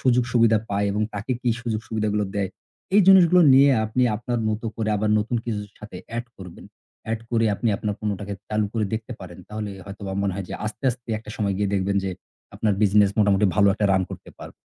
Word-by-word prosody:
সুযোগ-সুবিধা 120 -3 +3
পায় 100 0 +1
এবং 105 +2 0
তাকে 105 +5 -3
কি 125 - +2
সুযোগ-সুবিধাগুলো 110 -2 -1
দেয়। 100 -2 -1 0.5
এই 205 - +7
জিনিসগুলো 180 -2 +7
নিয়ে 140 +1 +7
আপনি 110 +4 0
আপনার 120 +1 -3
মতো 110 +2 -2
করে 110 -1 -2
আবার 105 +1 0
নতুন 115 +3 -1
কিছুর 105 -3 -4
সাথে 105 -3 -10 0.2
add 120 - -2
করবেন। 90 -3 -11 0.5
add 115 - -2
করে 115 -1 +2
আপনি 115 - -1
আপনার 105 0 -3
পণ্যটাকে 100 -1 -3
চালু 105 -1 0
করে 110 -2 0
দেখতে 110 +3 -5
পারেন। 90 -2 -10
তাহলে 105 -1 -5
হয়তোবা 100 0 -7
মনে 100 -1 0
হয় 100 0 -4
যে - - -5
আস্তে, 110 +5 -7
আস্তে, 125 0 -10
একটা 110 - -11
সময় 100 -2 0
গিয়ে 105 -1 0
দেখবেন 100 +1 0
যে, 95 - -1 0.4
আপনার 105 - +1
business 105 -1 +4
মোটামুটি 100 -1 +4
ভালো 105 -1 +4
একটা 105 - +1
run 95 -1 +3
করতে - - -9
পারবে। - - -10
105 Hz, 200 wpm, -23 LUFS, 100-115 Hz, 0.5 s, এই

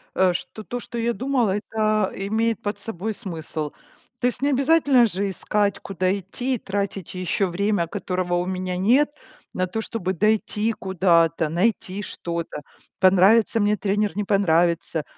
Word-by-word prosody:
э, 185 -1 +3
что 215 +4 -6
то, 245 +3 -5
что 240 - -8
я 235 +1 0
думала, 245 -6 +1
это, 215 -1 0
а, - - -8
имеет 220 +4 -1
под 205 -1 -3
собой 220 +1 -4
смысл. 160 -7 -5 0.5
То 245 - +2
есть 250 - -3
не 285 - +2
обязательно 275 -2 +4
же 200 -1 -1
искать, 200 +1 0
куда 185 0 -1
идти, 245 +7 -3
тратить 200 -3 -4
ещё 185 +2 0
время, 195 -1 0
которого 180 +1 -2
у 175 0 0
меня 185 -1 -3
нет, 245 +10 +4 0.4
на 185 0 -1
то, 220 +5 -3
чтобы 190 -5 -3
дойти 215 +3 +1
куда-то. 170 -5 +2
Найти 190 +2 0
что-то, 170 -5 -5 0.4
понравится 195 +5 +5
мне 210 0 +3
тренер, 205 -1 0
не 210 - 0
понравится. 170 -5 +2
200 Hz, 155 wpm, -23 LUFS, 180-220 Hz, 0.5 s, понравится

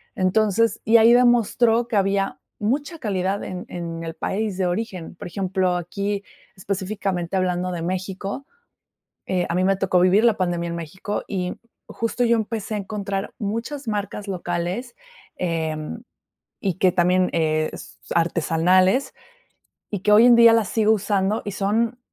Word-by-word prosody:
Entonces, 215 +3 +2
y 225 +1 +6
ahí 230 +1 +6
demostró 240 -1 +3
que 225 - +1
había 195 0 0 0.2
mucha 285 +9 -1
calidad 195 -3 -1
en 180 -1 -6
en 165 -1 -5
el 165 -1 -6
país 200 +3 -2
de 190 - 0
origen. 180 -2 -4
Por - - -8
ejemplo, 185 0 0
aquí 200 +3 -3 0.3
específicamente 190 -2 -3
hablando 180 0 0
de 175 -2 -4
México, 190 +7 -4 0.8
eh, 180 -1 0
a 170 - -1
mí 185 - +2
me 195 0 +2
tocó 185 -1 +2
vivir 185 +4 +4
la 230 -3 +4
pandemia 175 -2 -1
en 170 - -4
México 175 +5 -5
y 180 -3 -3 0.3
justo 230 +2 -2
yo 235 0 +4
empecé 220 -1 -3
a - - -1
encontrar 200 -1 -4
muchas 230 +6 -4
marcas 205 -1 -3
locales, 180 +5 -3 0.4
em, 160 +3 -3 0.6
y 195 -3 -1
que 185 +1 +3
también, 180 +1 +3
eh, 155 -1 +1
s - - -10 0.2
artesanales, 175 - +2 0.8
y 205 - -2
que 210 - +2
hoy 215 +3 +8
en 245 -1 +8
día 235 -1 +8
las 225 -5 +2
sigo 220 +1 +2
usando 205 0 0
y 205 - -3
son 220 +5 0
195 Hz, 155 wpm, -23 LUFS, 180-220 Hz, 0.8 s, hoy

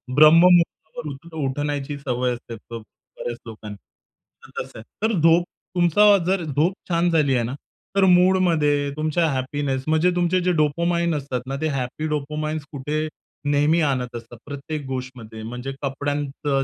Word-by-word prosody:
ब्रह्म-मुहूर्तावर 165 0 +5
उठ 165 +5 -14
उठण्याची 145 +1 -2
सवय 125 -2 -1
असते 120 -1 -8 0.2
बऱ्याच 115 +1 -8
लोकांना. 105 -2 -8 0.7
तर - - -5
तसं - - -12
आहे. - - -10 0.2
तर 225 - -1
झोप 165 +2 +5 0.3
तुमचा 200 +4 +5
जर 185 -1 +1
झोप 155 +5 +1 0.2
छान 170 0 +2
झाली 145 -5 +3
आहे 120 - +1
ना 125 - -4 0.4
तर 195 - +5
मूडमध्ये, 175 -6 +3
तुमच्या 155 +2 +1
हॅपीनेस 135 0 -2
म्हणजे 160 +3 +3
तुमचे 175 +1 +2
जे 180 +1 +2
डोपामाइन 170 +3 +1
असतात 135 -3 -3
ना 135 - -3
ते 160 - +1
हॅपी 135 +3 -3
डोपोमाइन्स 150 +1 -3
कुठे 150 +3 -2 0.4
नेहमी 150 +4 +3
आणत 130 -4 -1
असतात 120 0 -9
प्रत्येक 145 +1 -6
गोष्ट 130 -1 -4
मध्ये 110 -1 -9
म्हणजे 125 +4 -5
कपड्यांचं 145 0 -1
145 Hz, 150 wpm, -23 LUFS, 135-165 Hz, 0.7 s, ब्रह्म-मुहूर्तावर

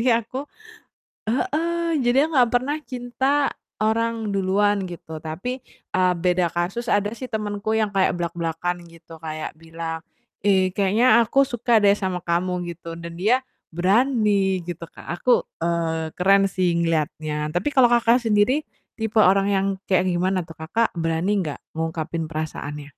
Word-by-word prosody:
Jadi 250 - +2
aku 255 +5 -3 0.8
heeh. 335 +3 0
Jadi 245 +2 +2
aku - - -10
gak 245 -2 +4
pernah 270 +5 +1
cinta 265 +3 0 0.3
orang 220 -1 0
duluan 200 +1 +2
gitu 165 -3 -8
tapi, 245 +12 -5 0.3
eee, 185 -1 +3
beda 180 -1 +1
kasus, 190 +8 -2
ada 205 +2 +1
sih 255 +1 -8
temenku 210 0 -2
yang 210 -2 0
kayak 190 - +3
blak-blakan 170 +1 -2
gitu 165 0 -14
kayak 155 -1 -5
bilang, 165 0 -6 0.4
"Ih 190 -2 +3
kayaknya 225 +4 +4
aku 270 +5 +3
suka 240 -3 +2
deh 200 -1 +5
sama 185 -3 -2
kamu," 175 +1 -1
gitu 165 0 -8
dan 170 0 -8
dia 215 +9 +3 0.3
berani 200 0 +2
gitu 170 -1 -5
Kak. - - -12
Aku, 250 -1 +3 0.2
eee, 165 -1 -1
keren 195 +2 +5
sih 180 -3 +1
ngeliatnya 155 -2 -1
tapi 195 +12 0
kalau 260 -3 +6
kakak 235 +1 +4
sendiri 230 +6 +2 0.3
tipe 220 0 -3
orang 195 +1 +4
yang 195 -1 +1 0.2
kayak 185 -1 +2
gimana 185 +1 0
tuh? 160 -1 -14
Kakak 225 +9 0
berani 165 +5 +1
nggak 155 -6 -3
ngungkapin 160 0 -3
perasaannya? 150 -2 -5
190 Hz, 150 wpm, -23 LUFS, 170-230 Hz, 0.8 s, kalau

